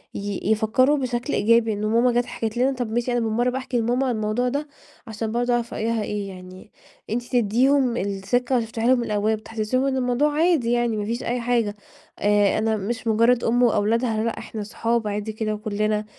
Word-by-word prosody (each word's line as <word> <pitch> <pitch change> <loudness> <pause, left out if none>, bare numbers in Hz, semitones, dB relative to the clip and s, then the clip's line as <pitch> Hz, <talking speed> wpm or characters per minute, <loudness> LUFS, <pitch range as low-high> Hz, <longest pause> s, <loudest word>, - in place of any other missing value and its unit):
ي 200 -1 -3
يفكروا 240 +7 +3
بشكل 250 0 -2
إيجابي، 230 +1 +3
إن 210 +1 -3
ماما 235 +3 +3
جات 240 0 +1
حكت 225 -2 -4
لنا، 260 +3 +2
طب 245 -4 -4
ماشي 240 +2 -1
أنا 240 - +1
بالمَرّة 240 +3 0
أحكي 255 -2 -2
لماما 245 +4 +1
عن 245 - 0
الموضوع 215 +3 0
ده، 285 +4 -3 0.4
عشان 220 0 -4
برضه 245 +1 0
أعرف 240 -1 -1
رأيها 225 0 -1
إيه، 205 -1 -4
يعني 185 +2 -12 0.4
أنتِ 240 +3 -1
تديهم 245 +2 +2
الثقة 200 +6 0
وتفتحي 225 0 -2
لهم 250 -1 +4
الأبواب، 215 0 0
تحسسيهم 225 +5 -1
إن 270 -1 0
الموضوع 255 +4 +1
عادي 310 -6 +2
يعني 240 -2 +1
ما 205 - -2
فيش 235 +3 -3
أي 245 +1 -1
حاجة، 235 -3 0 0.4
آآ 205 -1 +3
أنا 220 0 +1
مش 230 +4 -4
مجرد 230 +2 +3
أم 240 +2 +2
وأولادها، 225 0 +1
لأ 230 - -2
إحنا 215 -2 -6
صحاب 230 +1 -1
عادي 210 +1 -3
كده 215 0 -2
وكلنا. 215 0 -1
230 Hz, 190 wpm, -23 LUFS, 215-245 Hz, 0.4 s, لهم